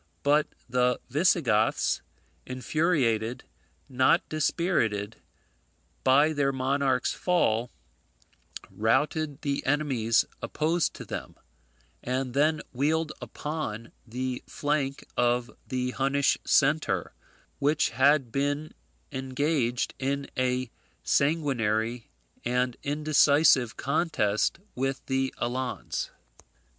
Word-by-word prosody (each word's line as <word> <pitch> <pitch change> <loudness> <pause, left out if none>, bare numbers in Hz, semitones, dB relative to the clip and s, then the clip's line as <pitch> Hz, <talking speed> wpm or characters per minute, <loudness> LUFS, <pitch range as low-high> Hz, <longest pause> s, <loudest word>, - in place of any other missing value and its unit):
But 150 +1 +3 0.2
the 125 0 +1
Visigoths, 140 - +2 0.5
infuriated, 130 -3 0 0.4
not 130 -1 +3
dispirited, 120 - 0 0.9
by 145 +4 +5
their 140 -2 +1
monarch's 130 -1 0
fall, 125 -10 +1 1.0
routed 145 +6 0
the 140 -2 -1
enemies 130 -6 +2 0.2
opposed 165 +2 0
to - - -8
them, - - -6 0.7
and 130 0 -2
then 150 +3 +2
wheeled 155 +4 +1
upon 120 -8 -5 0.2
the 125 +2 -3
flank 145 -2 -2
of 120 0 +1 0.2
the 125 -1 -1
Hunnish 135 +2 +2
centre, 135 - +2 0.5
which 145 +2 +2
had 135 0 +3
been 145 +3 -1 0.4
engaged 130 -2 -1
in 140 +1 -1
a 125 -1 0 0.3
sanguinary 120 -7 0 0.3
and 125 0 0
indecisive 145 -4 +3
contest 140 -9 0 0.2
with 135 +1 -2
the 135 0 0
Alans. 125 +1 -3
135 Hz, 85 wpm, -27 LUFS, 125-150 Hz, 1.0 s, by